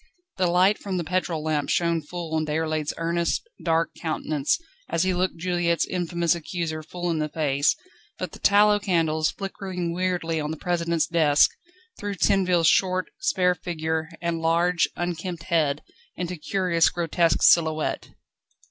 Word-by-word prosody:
The 185 -1 +2
light 185 +4 +3
from 195 -2 -3
the 175 - -1
petrol 170 -2 -1
lamp 155 -2 -1
shone 170 -1 +1
full 165 +1 -7
on 160 -1 +1
Déroulède's 155 -1 -1
earnest, 170 - -1 0.2
dark 165 0 +1
countenance 155 -3 -1 0.3
as 165 - +1
he 185 0 +1
looked 180 0 -1
Juliette's 175 -1 0
infamous 170 -1 0
accuser 165 -1 -4
full 175 +2 -4
in 160 - -1
the 155 0 -1
face, 145 -2 +1 0.4
but - - -4
the - - -12
tallow 205 +1 +5
candles, 165 -5 +1
flickering 185 -3 -4
weirdly 175 -3 -1
on 150 - -3
the 160 - -4
President's 170 -2 0
desk, 155 -4 +4 0.5
threw 205 -1 -3
Tinville's 180 -2 +2
short, 185 +2 +2
spare 185 - +2
figure 160 -2 -3
and 170 -1 -1
large, 170 +2 +2
unkempt 175 0 -4
head 155 -4 0 0.3
into 180 0 -3
curious 170 0 +1
grotesque 170 -1 +1
silhouette. 160 -2 +3
170 Hz, 150 wpm, -25 LUFS, 160-180 Hz, 0.5 s, tallow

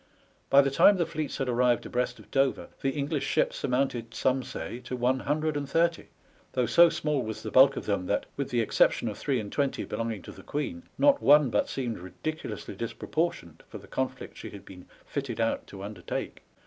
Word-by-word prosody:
By 140 - +8
the 135 - 0
time 195 +8 +6
the 170 - +1
fleets 155 -3 -4
had 135 - -2
arrived 125 0 +2
abreast 125 0 -1
of - - -17
Dover 135 -1 +1
the 135 - +1
English 145 +1 -2
ships - - 0
amounted 125 -3 -1
some 130 0 +1
say 115 -1 -6
to 125 +1 -6
one 125 +2 +1
hundred 155 +2 -1
and 140 -1 -3
thirty, 170 +2 +1 0.5
though 125 -1 +2
so 170 +9 +6
small 150 -4 -1
was 110 -2 -5
the - - -5
bulk 135 +1 +6
of - - -4
them 95 -3 -1
that, 100 - 0
with 140 -1 -3
the 120 -1 +1
exception 115 +1 +2
of 105 - -5
three 135 -4 0
and 105 -2 -6
twenty 140 -2 0
belonging 115 -4 -3
to - - -9
the - - -12
Queen, 150 - -4 0.2
not 285 -1 +4
one 145 -3 +6
but 105 - +1
seemed 120 -6 -3
ridiculously 105 - -6
disproportioned 115 - -3
for - - -7
the - - -13
conflict - - -4
she - - -7
had - - -11
been 90 -2 -12 0.2
fitted 135 -5 -4
out 115 0 0
to 95 -1 -9
undertake. 105 +1 -5
130 Hz, 205 wpm, -28 LUFS, 115-150 Hz, 0.5 s, By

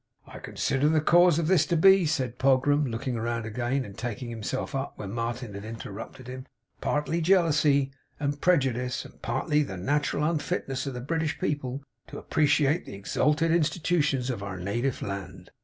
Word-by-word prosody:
'I - - -10
con - - -10
sider 140 +1 +2
the 160 0 +3
cause 175 +1 +5
of 170 - +1
this 180 +1 +4
to 170 - +1
be,' 190 0 +6
said 130 -6 -2
Pogram, 135 +2 +3
looking 120 +2 -3
round 115 0 -2
again 120 +4 -1
and 100 - -10
taking 120 +1 -5
himself 115 +5 -4
up 135 0 -3
where 100 - -6
Martin 115 +1 -4
had 100 0 -7
interrupted 115 +3 -8
him, 130 +1 -8 0.3
'partly 150 +3 0
jealousy 150 -6 +3 0.3
and 145 0 -2
pre 180 -1 +5
judice, 125 -2 -2
and - - -15
partly 150 +5 +1
the 95 -10 -4
nat'ral 145 +9 0
unfitness 145 -4 -2
of 135 - -4
the 125 - -5
British 160 +3 -1
people 140 -2 -2 0.2
to - - -8
appreciate 150 +1 +2
the - - -7
ex 100 - -7
alted 155 +3 +3
Institutions 155 -5 +1
of 115 -5 -5
our 100 -2 -5
native 120 +8 -2
land. 95 -2 -6
135 Hz, 180 wpm, -27 LUFS, 120-150 Hz, 0.3 s, be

